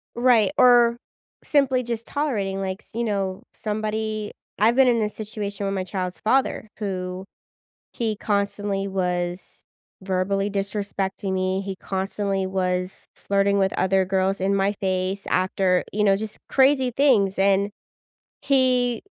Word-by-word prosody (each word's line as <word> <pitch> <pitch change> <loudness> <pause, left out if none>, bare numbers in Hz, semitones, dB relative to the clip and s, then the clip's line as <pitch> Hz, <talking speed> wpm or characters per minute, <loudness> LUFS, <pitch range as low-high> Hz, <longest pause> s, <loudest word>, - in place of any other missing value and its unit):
Right, 240 -2 +4
or 240 -2 +6 0.5
simply 270 -3 +2
just 230 -1 -4
tolerating, 205 -10 -2
like, 190 -1 -3
s - - -17
you 235 +1 -1
know, 195 -3 -2
somebody 215 0 -3 0.3
I've 225 +3 +4
been 265 -1 +5
in 235 -2 +3
a 210 - 0
situation 205 -2 -5
with 195 - -1
my 190 - -1
child's 185 -1 -4
father 230 -1 +1
who 185 -2 -4 0.7
he 225 -2 -1
constantly 200 -1 -1
was 180 -2 -3 0.4
verbally 195 +1 0
disrespecting 200 -1 -3
me. 185 0 0
He 195 -1 -5
constantly 195 0 -2
was 185 -1 -2
flirting 200 0 +1
with 190 -1 +2
other 190 0 +2
girls 190 +1 0
in 195 +1 +1
my 195 +1 +2
face 190 +1 -1
after 185 0 +2
you 210 +1 +1
know, 195 -1 +4
just 215 +1 -6
crazy 265 -2 +3
things 220 -9 +3
and 200 +1 +3 0.7
he 250 -3 +2
200 Hz, 140 wpm, -23 LUFS, 190-220 Hz, 0.7 s, or